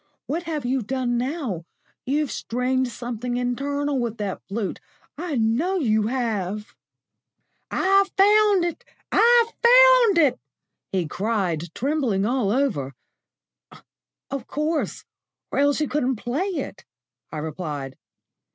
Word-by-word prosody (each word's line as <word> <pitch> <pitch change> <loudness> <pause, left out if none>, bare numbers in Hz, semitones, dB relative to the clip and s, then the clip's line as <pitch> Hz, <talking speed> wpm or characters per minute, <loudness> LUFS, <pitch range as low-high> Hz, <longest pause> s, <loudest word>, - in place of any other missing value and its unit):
What 320 +5 -2
have 300 -5 -3
you 260 +1 0
done 245 +1 -1
now? 250 - -3 0.4
You've 290 +1 0
strained 255 +2 -1
something 245 +1 -4
internal 280 +3 -1
with 235 -2 -2
that 205 -3 -4
flute 200 0 -3 0.4
I 325 -1 -4
know 245 +11 +1
you 220 - +2
have." 215 -5 -2 1.0
"I've 390 +1 +3
found 410 -2 +5
it! 350 +8 -4 0.3
I've 475 0 +5
found - - +7
it!" 295 -6 +4 0.5
he 185 -4 0
cried, 180 -4 -2
trembling 250 -7 0
all 240 -3 +1
over. 205 - 0 1.4
"Of 275 -4 -4
course, 305 +2 -2 0.5
or - - 0
else 285 +1 +3
you 305 - 0
couldn't 265 -3 0
play 255 - -2
it," 310 - -5 0.5
I - - -5
replied. 150 -3 -5
255 Hz, 120 wpm, -24 LUFS, 215-310 Hz, 1.4 s, found